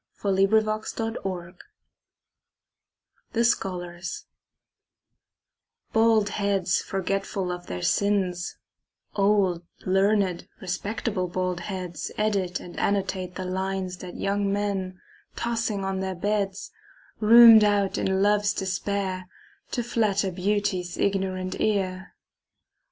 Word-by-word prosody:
William 195 -1 +3
Butler 220 +1 0
Yeats 180 -2 -4 1.8
The 235 0 +2
Scholars 180 -5 -2 1.7
BALD 225 -2 +4
heads 200 -4 0
forgetful 195 -1 -2
of 175 0 -6
their 90 -1 -5
sins, 190 -3 0 0.6
Old, 195 -4 +2 0.2
learned, 190 -1 +2
respectable 195 +1 -2
bald 180 0 -2
heads 180 -3 -5
Edit 200 -4 0
and 175 - -9
annotate 190 -2 -1
the 185 - -4
lines 190 0 -2
That 180 -1 -9
young 200 0 0
men, 195 -2 -2 0.4
tossing 230 -4 -1
on 190 0 -2
their 190 0 -3
beds, 200 +1 -2 0.5
Rhumed 225 0 +9
out 205 -2 +2
in 190 0 +1
love's 205 0 +2
despair 190 -1 -2 0.4
To 240 - -2
flatter 210 -5 +1
beauty's 190 -1 -1
ignorant 190 -2 -1
ear. 190 -3 -1
195 Hz, 100 wpm, -26 LUFS, 185-205 Hz, 1.8 s, Rhumed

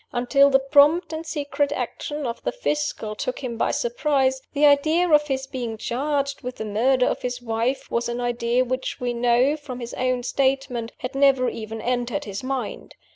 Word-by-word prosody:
Until 275 +3 +4
the 270 - +5
prompt 295 +5 +4
and 320 +1 -5
secret 285 -2 -1
action 290 +3 -4
of 235 -1 -4
the - - -1
Fiscal 295 - -2
took 250 +5 -4
him 240 -2 -3
by 225 - 0
surprise, 265 +1 +1
the 295 +1 +3
idea 310 +5 +4
of 300 -2 +4
his 265 -1 -2
being 245 -4 -5
charged 280 +4 -2
with 250 -1 -5
the 220 - -5
murder 250 +5 +2
of - - -1
his 250 0 -3
wife 235 +2 -2
was 235 0 0
an 240 +1 -3
idea 240 +1 +1
which 255 +1 -3
we 245 -1 -1
know, 245 +4 +3
from 290 -5 -8
his 235 -1 -7
own 255 -1 -1
statement, 265 -3 0
had 250 +2 -5
never 270 -2 +4
even 225 -1 -6
entered 245 -1 -1
his 200 -1 -5
mind. 260 -1 -4
255 Hz, 185 wpm, -23 LUFS, 240-280 Hz, -, the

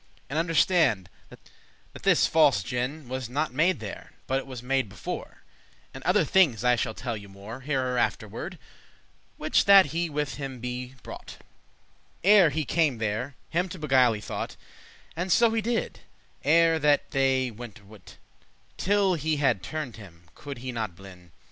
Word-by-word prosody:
And 150 - 0
understande, 165 - +2 0.2
that - - -17 0.5
this - - +4
false 145 - +4
gin* 125 - -3
*contrivance 135 - -17
Was 130 -1 -4
not 145 +2 -1
made 170 +7 +2
there, 105 -3 -8
but 135 +1 0
it 135 - -9
was 125 -3 -8
made 130 -3 0
before; 95 -3 -7 0.5
And 135 - -9
other 180 -1 +3
thinges 150 - +3
I 125 0 +4
shall 110 -1 -2
tell 120 -3 -4
you 100 -2 -10
more, 100 +6 -9
Hereafterward, 130 -3 -2 0.8
which - - +2
that 200 -1 +8
he 170 0 -1
with 150 -1 -3
him 135 -2 -5 0.5
brought; - - -9 0.9
Ere 195 -3 +7
he 155 +1 -2
came 155 -4 +1
there, 110 +5 -3 0.2
him 180 +3 0
to 185 - -7
beguile 130 -6 +3
he 105 - -6
thought, - - -5 0.6
And 180 +2 -2
so 230 +5 +5
he 225 0 0
did, 230 +1 -2 0.4
ere 165 +2 +4
that 145 -1 +2
they 135 -2 +1
*went 115 -1 -10
atwin;* 100 -1 -16
*separated* - - -16 0.6
Till 200 -1 +2
he 155 -1 0
had 135 -9 +2
turned 150 - -5
him, 85 -5 -15
could 140 -3 -8
he 130 - -2
not 110 -7 -4
blin. 90 -2 -14
135 Hz, 165 wpm, -27 LUFS, 115-160 Hz, 0.9 s, that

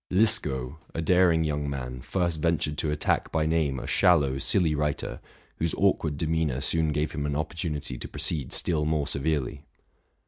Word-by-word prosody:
Liskow, 75 - +1 0.2
a 80 - -1
daring 85 -1 +4
young 75 -2 -1
man, 65 -2 -5
first 85 +1 -1
ventured 80 -2 +1
to 80 - 0
attack 75 0 0
by 80 -1 +1
name 80 -4 +1
a - - -6
shallow, 70 -7 +3
silly 80 +2 +2
writer, 75 -1 -2 0.4
whose 85 0 -1
awkward 80 -7 +1
demeanor 80 -4 0
soon 80 +2 0
gave 75 0 -1
him 75 -1 -2
an 70 - -2
opportunity 75 -4 -3
to - - -5
proceed 75 -2 -1
still 80 -3 0
more 75 -1 +1
severely. 70 -1 -2
75 Hz, 165 wpm, -27 LUFS, 70-80 Hz, 0.4 s, daring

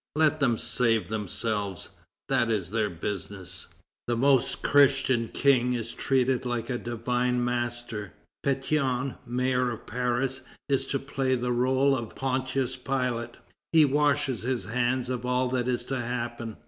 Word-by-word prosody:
Let 155 0 +3
them 120 -5 +2
save 115 -5 +1
themselves; 105 -2 -3 0.4
that 115 - +2
is 100 -5 -1
their 110 -2 +1
business!" 95 +1 -5 0.4
The 120 -1 0
Most 135 0 +2
Christian 135 -4 +4
King 125 -2 +3
is 115 -1 -3
treated 130 -1 +1
like 120 -2 -2
the 125 -1 -3
Divine 120 +1 0
Master. 120 -5 -3 0.3
Pétion, 135 -1 0
mayor 125 +1 +1
of 115 - -6
Paris, 125 +2 -1 0.3
is 135 -2 +1
to 135 - 0
play 135 -1 -1
the 125 0 -1
rôle 130 +3 +3
of 115 -4 -5
Pontius 130 -1 -1
Pilate. 125 -2 -2 0.4
He 160 -2 +7
washes 145 -2 +1
his 120 -4 -2
hands 125 +3 0
of 125 -1 -3
all 125 0 +1
that 125 -1 0
is 125 -1 0
to 135 -1 -2
happen. 120 -2 -4
125 Hz, 145 wpm, -27 LUFS, 115-130 Hz, 0.4 s, He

